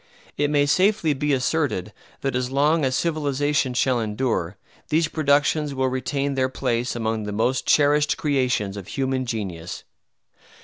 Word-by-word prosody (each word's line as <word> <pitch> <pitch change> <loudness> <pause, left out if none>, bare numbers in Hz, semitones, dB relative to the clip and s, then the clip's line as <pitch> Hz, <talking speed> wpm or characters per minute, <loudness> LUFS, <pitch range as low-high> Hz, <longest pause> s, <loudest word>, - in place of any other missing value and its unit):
It 145 0 +1
may 145 -1 +3
safely 185 +1 +2
be 145 +2 -1
asserted 130 - 0 0.3
that 135 -2 -1
as 125 0 -1
long 150 +4 +2
as 130 -1 +1
civilization 145 -4 0
shall 125 0 +2
endure 105 -4 -2 0.3
these 160 +1 +2
productions 145 -1 +1
will 130 0 +1
retain 135 +2 -2
their 130 -1 +1
place 120 -1 -1
among 110 -1 -1
the 105 - -4
most 120 +5 0
cherished 150 0 +3
creations 125 -9 0
of 95 - -8
human 130 -1 -2
genius. 95 -8 -5
135 Hz, 145 wpm, -23 LUFS, 120-145 Hz, 0.3 s, may